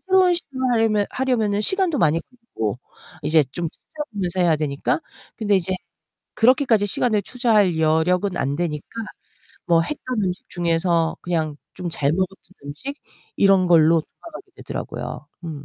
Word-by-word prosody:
새로운 375 -1 +5
시도를 265 -6 -3
하려면 220 -3 +2
하려면은 225 -6 0
시간도 360 - +1
많이 165 -2 +3
걸리고 195 - -5 0.4
이제 155 +1 +4
좀 170 +3 -2
찾아보면서 200 - -5
해야 170 -3 +4
되니까. 150 0 -1 0.4
근데 210 -2 +2
이제 185 0 -1 0.6
그렇게까지 240 -3 +4
시간을 210 +1 +1
투자할 210 -7 +2
여력은 175 +4 +2
안 140 -2 -1
되니까 150 -3 -2 0.8
뭐 170 -2 +4
했던 255 - -3
음식 180 -1 -3
중에서 170 -1 +1
그냥 160 -4 -1 0.2
좀 180 -1 -5
잘 145 -4 0
먹었던 190 +2 -3
음식 265 - -7 0.4
이런 195 -2 +5
걸로 165 -1 +5
돌아가게 335 - -13
되더라고요. 150 - -6 0.2
음. 165 - -4
185 Hz, 335 characters per minute, -22 LUFS, 165-235 Hz, 0.8 s, 새로운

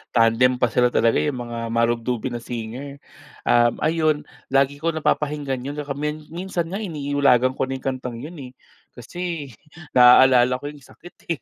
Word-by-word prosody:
tandem 115 +2 +4
pa 125 - +3
sila 125 +1 +3
talaga 115 -1 +2
'yong 145 -3 -1
mga 120 -1 -6
marubdubin 115 +1 -1
na - - -4
singer. 125 +5 -7 0.5
Uhm 120 -1 +3
ayun 155 -1 +2 0.3
lagi 135 +1 +2
ko 165 +2 0
napapakinggan 150 -4 -1
'yon 140 +2 -5
saka 145 -1 -5
min 150 +1 -4
minsan 175 0 -3
nga 190 +4 -4
iniilagan 140 - +1
ko - - -1
na 135 - -3
'yong 130 - -9
kantang 130 -2 -4
'yon 165 +1 -9
eh, 130 -2 -9 0.4
kasi 165 +3 -6 0.4
naalala 125 0 +6
ko 145 - -4
'yong 150 - -14
sakit 175 +5 -16
eh 165 -4 -2
135 Hz, 170 wpm, -22 LUFS, 125-150 Hz, 0.5 s, naalala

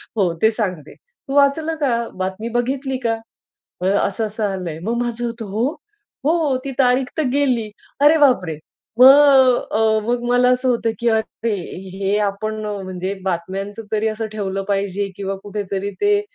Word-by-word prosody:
हो, 185 -6 +1
ते 220 - +6
सांगते, 190 -9 -4
"तू 470 - -12
वाचलं 295 +3 +3
का? 235 -4 +1
बातमी 190 +5 -4
बघितली 260 +3 -1
का? 225 - +2 0.7
अ, 185 - -1
असं 200 +2 +1
असं 215 +1 -4
आलंय." 175 -5 -5
मग 230 +4 -1
माझं 240 0 -3
होतं, 230 -1 -4
"हो?" 220 +5 0 0.6
"हो, 310 -4 +2
ती 275 - -3
तारीख 255 0 +3
तर - - +3
गेली." 250 -7 +1 0.3
अरे 305 +2 +7
बापरे! 190 - +3 0.4
मग 265 -1 +7
अ, 220 0 +2
मग 240 0 0
मला 245 0 +4
असं 255 +1 +1
होतं, 235 -2 +1
की 235 -1 +1
"अरे! 220 0 -1 0.4
हे 200 +1 +1
आपण 215 +2 -4
म्हणजे 190 -2 -4
बातम्यांचं 195 +4 -3
तरी 215 +1 +1
असं 220 +1 -3
ठेवलं 195 -2 -3
पाहिजे 200 0 -1
किंवा 195 -1 -3
कुठेतरी 200 -1 -4
ते 410 0 +3
220 Hz, 160 wpm, -20 LUFS, 200-255 Hz, 0.7 s, अरे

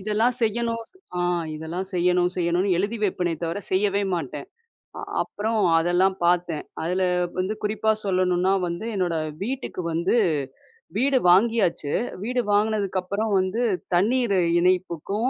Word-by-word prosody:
இதெல்லாம் 215 +5 +1
செய்யணும். 230 +1 0 0.4
அ - - -1 0.4
இதெல்லாம் 165 +4 -5
செய்யணும், 180 0 +2
செய்யணும்னு, 180 +2 +1
எழுதி 205 +5 -1
வப்பேனே 180 -4 0
தவிர 165 +4 -2
செய்யவே 200 +1 +2
மாட்டேன். 145 -3 -5 0.5
அ - - -6 0.2
அப்பறம் 220 +1 -2 0.2
அதெல்லாம் 180 +3 +2
பாத்தேன், 175 -3 +1 0.2
அதுல 180 +3 -1 0.4
வந்து 185 +3 0
குறிப்பா 220 +1 +1
சொல்லணுன்னா 185 0 +2
வந்து 170 +5 -4
என்னோட 175 -3 0 0.3
வீட்டுக்கு 255 -5 -4
வந்து 170 +7 +1 0.8
வீடு 265 +3 +3
வாங்கியாச்சு, 190 -6 +3 0.3
வீடு 250 +2 0
வாங்கினதுக்கப்புறம் 205 0 0
வந்து 185 +5 -1 0.3
தண்ணீரு 215 +1 +2 0.2
இணைப்புக்கும், 185 +5 0
190 Hz, 120 wpm, -24 LUFS, 175-215 Hz, 0.8 s, வீடு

